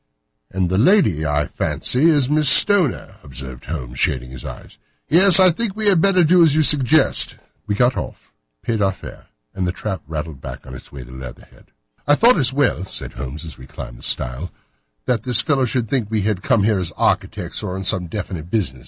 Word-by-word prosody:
"And 90 -1 -2
the 95 - +1
lady, 110 - +2
I 75 0 0
fancy, 130 +5 -1
is 145 -5 +3
Miss 150 -1 +3
Stoner," 185 - +4
observed 65 -2 -7
Holmes, 65 -5 -7
shading 65 -1 -2
his 65 - -10
eyes. - - -11 0.3
"Yes, 185 +6 +6
I 185 -1 +6
think 205 +3 -2
we 215 -1 +2
had 185 -5 +4
better 185 -2 +4
do 175 +3 +4
as 160 -3 +4
you 155 - +3
suggest." 145 0 +3 0.3
We 105 - -1
got 120 +3 +1
off, 90 - -8 0.3
paid 115 -3 -2
our 95 -1 +1
fare, - - -13 0.3
and 90 -1 -3
the - - -1
trap 95 +1 -6
rattled 75 -3 -7
back - - -9
on 65 - -11
its 65 - -12
way 65 -3 -10
to - - -15
Leatherhead. 65 -1 -13 0.4
"I 145 - +4
thought 240 +9 +4
it - - 0
as 135 -2 +2
well," 135 -9 0
said 95 - -7
Holmes 70 +5 -8
as 80 -5 -10
we 65 - -13
climbed - - -10
the - - -16
stile, 60 +9 -4 0.5
"that 120 -4 -1
this 125 0 +1
fellow 135 0 0
should 120 -1 -2
think 115 -3 -2
we 110 -1 -1
had 105 -3 -2
come 115 -1 +1
here 105 -2 +1
as 90 -3 -3
architects, - - -2
or 90 - -5
on 95 - -6
some 95 -1 +1
definite 90 -3 -7
business. 90 - -2
105 Hz, 215 wpm, -19 LUFS, -, 0.5 s, Yes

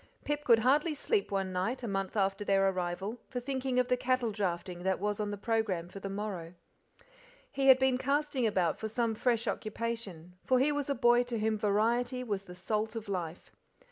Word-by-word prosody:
Pip 295 0 -1
could 235 -5 +6
hardly 300 +4 +3
sleep 410 - 0
one 195 -2 -1
night, 225 +8 -1
a - - -2
month 195 0 -2
after 195 0 +1
their 195 -1 +3
arrival, 190 +5 -3
for 250 - -3
thinking 260 0 -2
of 250 -1 +3
the 250 - +3
cattle 250 -2 0
drafting 180 -3 -3
that 190 0 0
was 205 +1 -1
on 210 -1 -1
the 205 - -4
programme 205 -6 -1
for 195 - -9
the 195 - -5
morrow. 195 -4 -5 1.0
He 275 -1 0
had 265 -1 +9
been 260 -1 +2
casting 280 -2 +1
about 185 -6 +1
for 220 - -3
some 230 +1 0
fresh 230 +1 0
occupation, 215 -6 -4
far 255 - +3
he 270 +4 +3
was 290 -1 -2
a 280 - +1
boy 240 -1 +5
to 240 -1 -3
whom 220 0 +1
variety 235 +5 +1
was 200 -5 -3
the 180 - -10
salt 215 +4 -2
of 225 -1 -5
life. 175 -4 -4
220 Hz, 205 wpm, -31 LUFS, 195-250 Hz, 1.0 s, had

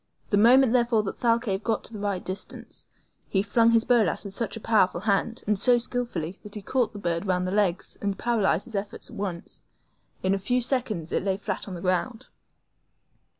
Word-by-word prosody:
The - - +4
moment, 245 +3 +6
therefore, 235 -3 +3
that 195 - -5
Thalcave 230 -4 +1
got 225 -1 -1
to 225 - -9
a - - -6
right 200 -3 -2
distance, 190 +2 -5 0.4
he 195 -1 +1
flung 230 +3 +3
his 230 -1 +4
BOLAS 230 -5 +2
with 195 -1 -8
such 225 0 -2
a - - -6
powerful 195 -6 +2
hand, 210 +3 0
and 210 -2 +1
so 245 +2 +5
skillfully, 235 -8 -3
that 210 0 -6
he 210 - -6
caught 245 0 0
the - - -8
bird 170 0 -2
round 180 -1 +1
the 185 - -2
legs 195 -3 0
and 200 -1 -1
paralyzed 210 -7 +1
his 235 - -10
efforts 200 +4 -4
at - - -10
once. 190 -5 -4 0.6
In 190 +1 +2
a 195 - 0
few 245 +6 +1
seconds 235 - -1
it - - +1
lay 190 -1 0
flat 200 -1 -4
on 190 - -6
the 170 - -7
ground. 205 +7 -1
205 Hz, 205 wpm, -26 LUFS, 190-230 Hz, 0.6 s, moment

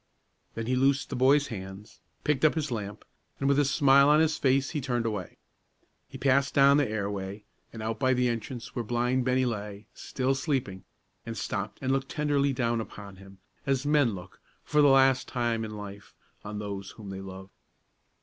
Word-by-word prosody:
Then 115 - -3
he 130 +2 0
loosed 135 +3 +1
the - - -2
boy's 140 +3 +4
hands, 95 -1 -9 0.2
picked 150 -2 0
up 155 - +5
his 150 -4 -2
lamp, 105 -3 -5 0.3
and, 135 - 0
with 140 0 +3
a - - +5
smile 140 0 +5
on 150 +1 +6
his 160 -1 +2
face, 135 0 +1
he 150 - -2
turned 120 -3 -1
away. 105 -5 -4 0.7
He - - -9
passed 140 +1 +2
down 140 0 +6
the 145 -6 +1
airway, 100 -1 -4 0.3
and 110 -1 -7
out 110 0 -3
by 130 0 +3
the 125 0 +2
entrance 120 +1 -4
where 120 - -1
blind 120 +2 0
Bennie 130 0 +2
lay, 105 -3 -4
still 130 0 -1
sleeping, 135 - -2 0.4
and 115 -1 -6
stopped 100 0 -4
and 130 - 0
looked 135 0 -1
tenderly 145 -2 +1
down 120 -3 0
upon 100 -3 -10
him, 95 0 -14 0.3
as 135 0 +1
men 145 -7 +3
look, 90 0 -12 0.2
for 150 0 +2
the 145 - +6
last 135 -1 +4
time 115 -2 -1
in 110 -1 -6
life, 100 -1 -10 0.3
on 105 0 -6
those 100 -2 -5
whom 105 -3 -8
they 95 0 -6
love. 95 0 -10
125 Hz, 190 wpm, -28 LUFS, 105-135 Hz, 0.7 s, on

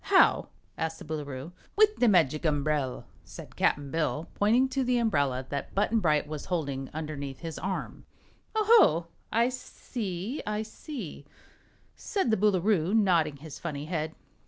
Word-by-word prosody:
How?" - - +5 0.3
asked 160 0 -2
the - - -10
Boolooroo. 145 -1 -5 0.2
"With 425 0 +5
the 245 - +4
Magic 160 - +4
Umbrel," 145 -3 0 0.2
said - - -11
Cap'n 140 -1 +1
Bill, 160 0 -1
pointing 230 +6 +3
to 270 0 0
the 250 0 +2
umbrella 140 - +1
that 140 -1 -4
Button 210 +3 +2
Bright 150 -6 +2
was 150 -1 -6
holding 140 -7 -2
underneath 145 -4 -5
his 165 -2 -5
arm. 190 +2 -4 0.5
"Oh, 435 -1 +2 0.4
ho! - - -25 0.2
I 235 +2 +3
see 230 - -5
I 210 +1 -2
see," 220 - -8 0.7
said 385 - -1
the 220 - +3
Boolooroo, 195 -2 +2
nodding 170 -8 +3
his 150 0 -10
funny 150 -4 -4
head. 160 -1 -3
165 Hz, 150 wpm, -28 LUFS, 150-215 Hz, 0.7 s, How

